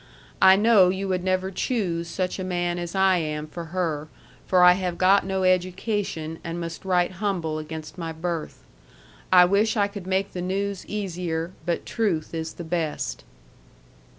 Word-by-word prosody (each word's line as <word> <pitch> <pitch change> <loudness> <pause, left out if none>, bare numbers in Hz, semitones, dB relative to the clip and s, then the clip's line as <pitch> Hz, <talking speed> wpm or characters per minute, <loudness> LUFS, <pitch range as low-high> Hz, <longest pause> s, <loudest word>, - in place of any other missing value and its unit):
I 190 0 +8
know 205 -3 +5
you 190 +1 -2
would 180 -1 0
never 185 0 0
choose 180 -6 -1
such 180 +3 -3
a - - -2
man 175 -1 -1
as 175 +1 -5
I 190 -1 +4
am 150 -2 -3
for 165 +2 -7
her 160 -3 -2 0.4
for 180 -1 +4
I 180 - +9
have 180 -2 -3
got 190 +1 +4
no 190 -1 -1
education 185 -2 -1
and 170 0 -4
must 165 -1 -6
write 180 -2 +2
humble 170 -7 -1
against 155 +3 -8
my 165 -1 -3
birth. 165 0 -4 0.7
I 180 -1 +8
wish 205 +5 +2
I 200 -1 +3
could 200 -2 -9
make 190 +1 0
the 180 - -4
news 195 +1 -2
easier 175 -5 -3 0.2
but 170 - -1
truth 180 -10 -1
is 160 -1 -4
the 175 - -8
best. 160 - -3
180 Hz, 170 wpm, -25 LUFS, 165-190 Hz, 0.7 s, I